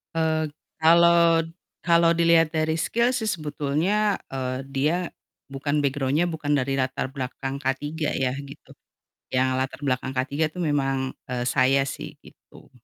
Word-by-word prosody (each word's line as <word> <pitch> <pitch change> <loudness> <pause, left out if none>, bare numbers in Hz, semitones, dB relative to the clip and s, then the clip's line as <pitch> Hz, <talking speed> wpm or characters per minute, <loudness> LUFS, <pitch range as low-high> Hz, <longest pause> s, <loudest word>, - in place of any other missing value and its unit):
Eee, 160 -1 +1 0.3
kalo 170 0 +5 0.4
kalo 170 -1 +5
diliat 165 -1 +4
dari 160 0 0
skill 235 +7 +1
sih 220 -3 -1
sebetulnya, 165 +5 0 0.2
eee, 130 0 -3
dia 135 +4 0 0.6
bukan 145 +2 -1
background-nya 140 +3 +1
bukan 155 -3 -2
dari 135 0 -1
latar 130 0 -2
belakang 135 0 -4
K3 135 -1 -1 0.4
ya, 130 -1 0
gitu. 140 0 -13 0.6
Yang 130 0 +2
latar 130 0 -3
belakang 130 0 -1
K3 130 +1 -1 0.2
itu 180 - -12
memang, 135 -4 0 0.2
eee, 125 -1 -2
saya 135 +2 +3
sih - - -7
gitu. - - -18
145 Hz, 135 wpm, -24 LUFS, 135-165 Hz, 0.6 s, kalo